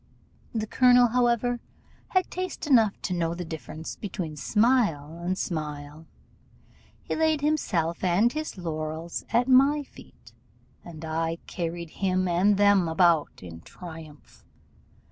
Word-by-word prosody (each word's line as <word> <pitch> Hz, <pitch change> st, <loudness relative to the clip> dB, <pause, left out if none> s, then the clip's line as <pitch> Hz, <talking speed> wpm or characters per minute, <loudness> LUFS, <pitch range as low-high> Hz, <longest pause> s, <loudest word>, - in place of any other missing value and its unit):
The 220 Hz, -2 st, -2 dB
colonel, 245 Hz, +1 st, +5 dB
however, 245 Hz, 0 st, +1 dB, 0.5 s
had 370 Hz, -1 st, 0 dB
taste 370 Hz, -1 st, -4 dB
enough 230 Hz, -8 st, +4 dB
to 185 Hz, -, -2 dB
know 170 Hz, -1 st, -1 dB
the 180 Hz, 0 st, -5 dB
difference 160 Hz, 0 st, -7 dB
between 180 Hz, -6 st, -5 dB
smile 170 Hz, -, +1 dB
and 180 Hz, +2 st, -2 dB
smile: 150 Hz, -2 st, -5 dB, 1.0 s
he -, -, -3 dB
laid 315 Hz, -2 st, +1 dB
himself 185 Hz, -, 0 dB
and 190 Hz, +7 st, +3 dB
his 310 Hz, -7 st, -5 dB
laurels 160 Hz, -1 st, -4 dB
at 240 Hz, +2 st, +2 dB
my 275 Hz, +3 st, +5 dB
feet, -, -, -17 dB, 0.5 s
and 160 Hz, -2 st, -9 dB
I 165 Hz, +1 st, -2 dB
carried 170 Hz, -1 st, -5 dB
him 185 Hz, -1 st, +1 dB
and 190 Hz, +4 st, +3 dB
them 200 Hz, -3 st, +4 dB
about 160 Hz, -, +2 dB
in 85 Hz, -2 st, -9 dB
triumph. 160 Hz, -, -12 dB
180 Hz, 125 wpm, -26 LUFS, 160-240 Hz, 1.0 s, colonel